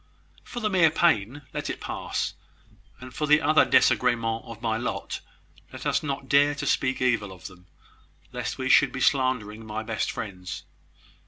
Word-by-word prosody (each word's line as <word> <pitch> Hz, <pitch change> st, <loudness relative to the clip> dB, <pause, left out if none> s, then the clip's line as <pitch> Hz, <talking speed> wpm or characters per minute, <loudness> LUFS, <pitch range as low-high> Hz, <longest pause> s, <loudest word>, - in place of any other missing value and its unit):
"For 240 Hz, -, -7 dB
the 215 Hz, -, +1 dB
mere 175 Hz, -4 st, +5 dB
pain, 145 Hz, -5 st, +1 dB
let -, -, -3 dB
it -, -, -4 dB
pass; -, -, -3 dB, 0.7 s
and 130 Hz, 0 st, -10 dB
for 150 Hz, -, -2 dB
the 150 Hz, +1 st, +6 dB
other 155 Hz, 0 st, +4 dB
desagremens 115 Hz, -2 st, +2 dB
of 115 Hz, -1 st, -9 dB
my 115 Hz, -1 st, -1 dB
lot, 115 Hz, +2 st, -3 dB, 0.5 s
let -, -, -9 dB
us -, -, +1 dB
not 135 Hz, -2 st, -4 dB
dare 145 Hz, +1 st, +4 dB
to 145 Hz, -, -4 dB
speak 130 Hz, -1 st, +1 dB
evil 115 Hz, -6 st, +1 dB
of 90 Hz, -3 st, -13 dB
them, 90 Hz, -1 st, -11 dB, 0.6 s
lest 125 Hz, -2 st, -4 dB
we 130 Hz, -1 st, -2 dB
should -, -, +5 dB
be 130 Hz, -, -5 dB
slandering 125 Hz, -6 st, +1 dB
my 110 Hz, 0 st, -5 dB
best 110 Hz, 0 st, -2 dB
friends. 90 Hz, -5 st, -6 dB
125 Hz, 170 wpm, -26 LUFS, 110-145 Hz, 0.7 s, the